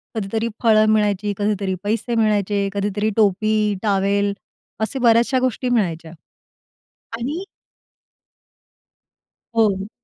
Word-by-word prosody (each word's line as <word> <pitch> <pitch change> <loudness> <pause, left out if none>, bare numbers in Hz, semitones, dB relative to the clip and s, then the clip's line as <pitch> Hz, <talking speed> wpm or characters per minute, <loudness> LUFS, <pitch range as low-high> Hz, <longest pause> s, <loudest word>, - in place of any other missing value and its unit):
कधीतरी 220 +2 -2 0.2
फळं 215 -2 +5
मिळायची, 210 -1 +1
कधीतरी 205 -2 -1
पैसे 225 +3 -1
मिळायचे, 205 -2 +1
कधीतरी 205 +1 -1
टोपी-टॉवेल, 205 -1 +1 0.5
असे 220 +5 -2
बऱ्याचशा 240 +2 +3
गोष्टी 255 0 -1
मिळायच्या. 170 -9 -1 1.1
आणि 290 +10 -4 2.1
हो. 205 -3 +1
210 Hz, 85 wpm, -20 LUFS, 200-225 Hz, 2.1 s, फळं